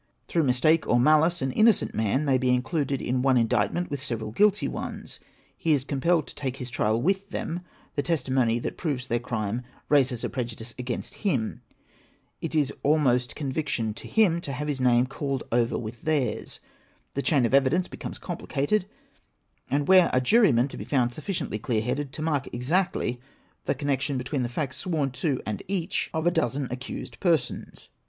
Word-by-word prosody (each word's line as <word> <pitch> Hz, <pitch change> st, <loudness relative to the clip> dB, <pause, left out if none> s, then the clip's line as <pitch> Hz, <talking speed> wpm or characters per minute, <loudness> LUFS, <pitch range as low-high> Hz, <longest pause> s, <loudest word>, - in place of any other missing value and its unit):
Through 170 Hz, -, +1 dB
mistake 155 Hz, +6 st, +3 dB
or 120 Hz, -, +4 dB
malice, 155 Hz, +5 st, +4 dB
an 135 Hz, -, 0 dB
innocent 220 Hz, -, +3 dB
man 110 Hz, +7 st, +1 dB
may 135 Hz, -2 st, +3 dB
be 130 Hz, 0 st, +1 dB
included 140 Hz, +1 st, -1 dB
in 125 Hz, +1 st, 0 dB
one 130 Hz, -1 st, +4 dB
indictment 125 Hz, +9 st, +1 dB
with 140 Hz, -2 st, -3 dB
several 115 Hz, -5 st, -3 dB
guilty 205 Hz, -, +3 dB
ones -, -, -6 dB, 0.2 s
— -, -, -32 dB
he 160 Hz, -, +2 dB
is 140 Hz, -3 st, +1 dB
compelled 155 Hz, +3 st, +1 dB
to -, -, -10 dB
take 130 Hz, -2 st, -4 dB
his 125 Hz, -2 st, -6 dB
trial 110 Hz, 0 st, +1 dB
with 195 Hz, +8 st, 0 dB
them; 170 Hz, -1 st, -3 dB, 0.3 s
the 145 Hz, -, 0 dB
testimony 130 Hz, -7 st, +1 dB
that 120 Hz, -, -4 dB
proves 140 Hz, -7 st, -2 dB
their 120 Hz, -2 st, 0 dB
crime 115 Hz, -1 st, -2 dB, 0.3 s
raises 130 Hz, -5 st, +3 dB
a -, -, -1 dB
prejudice 115 Hz, -2 st, -5 dB
against 125 Hz, -1 st, -4 dB
him; 130 Hz, -, 0 dB, 0.8 s
it 165 Hz, -1 st, -3 dB
is 145 Hz, -3 st, +2 dB
almost 135 Hz, -5 st, +2 dB
conviction 135 Hz, -6 st, -2 dB
to -, -, -9 dB
him 185 Hz, -7 st, +3 dB
to 140 Hz, -, -4 dB
have 150 Hz, +3 st, -3 dB
his 140 Hz, -3 st, -1 dB
name 125 Hz, -1 st, +4 dB
called 135 Hz, 0 st, -3 dB
over 120 Hz, 0 st, +2 dB
with 115 Hz, 0 st, -6 dB
theirs; 145 Hz, -7 st, -1 dB, 0.5 s
the 140 Hz, -, -1 dB
chain 140 Hz, -4 st, +3 dB
of 115 Hz, -, -1 dB
evidence 140 Hz, +7 st, +3 dB
becomes -, -, -7 dB
complicated, 175 Hz, +2 st, -1 dB, 0.8 s
and 140 Hz, +2 st, 0 dB
where 185 Hz, -2 st, +7 dB
are -, -, +5 dB
jurymen 135 Hz, -, +4 dB
to -, -, -8 dB
be -, -, -5 dB
found 125 Hz, -4 st, +1 dB
sufficiently 155 Hz, -, -3 dB
clear 110 Hz, -1 st, 0 dB
headed 130 Hz, +3 st, -2 dB
to 155 Hz, -, -5 dB
mark 145 Hz, -4 st, 0 dB
exactly 125 Hz, -1 st, 0 dB, 0.4 s
the -, -, +1 dB
connection 140 Hz, 0 st, -1 dB
between 130 Hz, +2 st, -2 dB
the 120 Hz, -, -1 dB
facts 130 Hz, +2 st, -3 dB
sworn 155 Hz, -7 st, -1 dB
to 135 Hz, +1 st, -1 dB
and 105 Hz, -2 st, -3 dB
each 185 Hz, -2 st, -1 dB
of 160 Hz, 0 st, -2 dB
a 175 Hz, -, +4 dB
dozen 135 Hz, -2 st, 0 dB
accused 125 Hz, +1 st, -6 dB
per 170 Hz, -4 st, +4 dB
sons 125 Hz, -4 st, -9 dB
135 Hz, 185 wpm, -26 LUFS, 125-160 Hz, 0.8 s, where